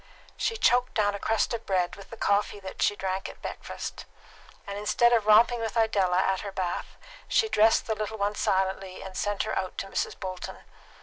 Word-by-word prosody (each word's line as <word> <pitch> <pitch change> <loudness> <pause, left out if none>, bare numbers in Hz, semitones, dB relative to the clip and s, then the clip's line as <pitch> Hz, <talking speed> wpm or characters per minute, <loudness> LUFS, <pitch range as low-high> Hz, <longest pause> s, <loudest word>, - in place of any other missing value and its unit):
She 455 - -1
choked 250 - +3
down 205 -2 +2
a 200 - -4
crust 225 +3 +1
of 230 -1 -5
bread 180 -2 +1
with 200 - -13
the 230 - -9
coffee 205 0 +1 0.2
she 205 - +2
drank 190 -1 -3
at - - -12
breakfast, - - -6 0.6
and 200 - -5
instead 225 +4 +3
of 220 -3 +2
romping 230 +3 +6
with 225 0 -3
Idella 200 -5 +2
at 190 0 +2
her 200 - -5
bath, 185 -2 -3 0.3
she 440 - +3
dressed 220 - +4
the 220 - 0
little 215 0 -4
one 205 0 0
silently, 190 -1 -1
and 190 -1 -9
sent 205 +1 -1
her 215 - -3
out 185 -1 -3
to - - -2
Mrs. 195 - -3
Bolton. 185 -1 -6
205 Hz, 195 wpm, -27 LUFS, 190-220 Hz, 0.6 s, romping